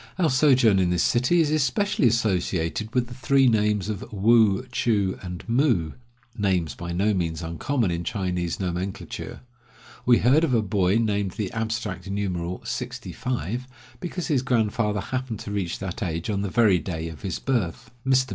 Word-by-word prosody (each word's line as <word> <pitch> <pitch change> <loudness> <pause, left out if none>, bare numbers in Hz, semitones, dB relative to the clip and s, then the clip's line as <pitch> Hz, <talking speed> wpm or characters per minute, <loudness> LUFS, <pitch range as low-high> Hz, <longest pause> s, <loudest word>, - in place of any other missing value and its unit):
Our 170 -6 +2
sojourn 130 -7 +4
in 90 -1 +2
this 90 -1 +2
city 125 +9 +3
is 150 -2 +1
especially 155 - +2
associated 105 -3 0
with 125 -1 +2
the 120 - -10
three 135 +2 +3
names 105 -3 +2
of 105 -3 -3
Woo, 110 +2 +4
Choo, 100 -6 0
and 90 -2 -7
Moo 115 - +2 0.2
— 125 -1 -36
names 90 -8 0
by 85 +3 -6
no 100 +5 +1
means 85 -3 -2
uncommon 95 - -1
in 85 0 -2
Chinese 90 -6 -2
nomenclature. 95 +1 -4 0.6
We 120 -1 +5
heard 135 +7 +4
of 140 -7 +2
a 110 - +2
boy 95 -1 +1
named 105 -4 0
the 105 -5 -3
abstract 110 -3 -3
numeral, 90 -3 -3
"sixty - - -5
five," 125 0 -3 0.3
because 180 0 -4
his 140 -5 +1
grandfather 110 -4 0
happened 130 0 -3
to 100 - -6
reach 95 -4 -2
that 95 +4 -5
age 85 0 -2
on 100 -1 -1
the 100 - -2
very 105 -5 +4
day 85 -5 -4
of 80 -2 -9
his 95 -4 -3
birth. 115 -2 -2
Mr. 130 0 +2
105 Hz, 175 wpm, -25 LUFS, 90-125 Hz, 0.6 s, We